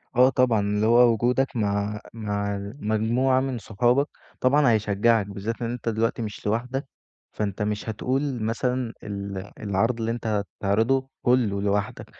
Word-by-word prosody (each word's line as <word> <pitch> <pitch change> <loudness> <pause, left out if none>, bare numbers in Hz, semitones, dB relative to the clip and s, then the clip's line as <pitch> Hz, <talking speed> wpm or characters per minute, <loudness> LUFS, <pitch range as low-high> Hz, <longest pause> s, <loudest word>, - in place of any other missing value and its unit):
آه 125 +2 +6
طبعًا، 125 -4 +3
اللي 105 +1 0
هو 120 +1 +6
وجودك 125 +4 +1
مع 105 -1 -1
مع 100 -2 -2
المجموعة 110 +4 0
من 130 -1 -2
صحابك، 120 +6 +1 0.3
طبعًا 135 +1 +4
هيشجعك 110 0 +2
بالذات 100 +4 -5
إن 115 - -1
أنت 120 -1 -3
دلوقتي 115 +1 0
مش 105 -2 -6
لوحدك، 125 +6 -1 0.4
فأنت 105 -1 -3
مش 105 +1 -2
هتقول 130 +3 -1
مثلًا 125 +1 -1
ال 100 -1 -5
العرض 110 +4 0
اللي 115 0 -1
أنت 115 -1 -4 0.3
هتعرضه 115 +7 +2
كلّه 115 -6 +2
لوحدك، 100 0 -1
115 Hz, 145 wpm, -25 LUFS, 105-125 Hz, 0.4 s, آه